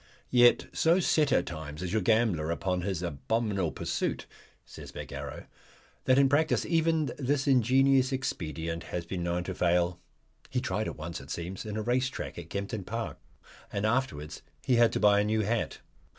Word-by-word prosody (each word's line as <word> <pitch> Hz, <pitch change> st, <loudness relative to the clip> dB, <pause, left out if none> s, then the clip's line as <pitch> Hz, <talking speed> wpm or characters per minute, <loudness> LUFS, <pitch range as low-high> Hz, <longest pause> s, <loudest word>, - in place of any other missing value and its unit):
"Yet 120 Hz, -1 st, +6 dB
so 170 Hz, +3 st, +3 dB
set 155 Hz, -5 st, +2 dB
at 90 Hz, -, +3 dB
times 80 Hz, 0 st, -6 dB
is 90 Hz, +1 st, -3 dB
your 110 Hz, -, +2 dB
gambler 110 Hz, -9 st, +2 dB
upon 90 Hz, +2 st, -1 dB
his 90 Hz, -2 st, -2 dB
abominable 95 Hz, -, -1 dB
pursuit," -, -, -2 dB, 0.4 s
says -, -, -11 dB
Bagarrow, -, -, -7 dB, 0.6 s
"that 130 Hz, -, +4 dB
in 140 Hz, 0 st, +6 dB
practice 150 Hz, +3 st, +2 dB
even 160 Hz, -2 st, +1 dB
this 135 Hz, 0 st, 0 dB
ingenious 130 Hz, +1 st, +4 dB
expedient 85 Hz, -, -3 dB
has 85 Hz, -1 st, -4 dB
been 90 Hz, +1 st, -4 dB
known 85 Hz, 0 st, -1 dB
to 95 Hz, -, -4 dB
fail." 90 Hz, 0 st, +1 dB, 0.5 s
He 125 Hz, -, 0 dB
tried 110 Hz, -4 st, -2 dB
it -, -, -6 dB
once, 80 Hz, +2 st, -6 dB
it -, -, -13 dB
seems, 90 Hz, +5 st, -5 dB
in 105 Hz, 0 st, -4 dB
a 110 Hz, -, -2 dB
race 125 Hz, +3 st, +1 dB
train 130 Hz, -, -6 dB
to 85 Hz, -, -8 dB
Kempton 100 Hz, +3 st, -4 dB
Park, 115 Hz, +4 st, -4 dB, 0.5 s
and 100 Hz, +1 st, -1 dB
afterwards 110 Hz, -, -1 dB, 0.2 s
he 125 Hz, -, +3 dB
had 115 Hz, -1 st, +5 dB
to -, -, 0 dB
buy 105 Hz, -1 st, +5 dB
a -, -, +3 dB
new 110 Hz, +1 st, +1 dB
hat. 110 Hz, +2 st, -1 dB
105 Hz, 180 wpm, -29 LUFS, 85-130 Hz, 0.6 s, Yet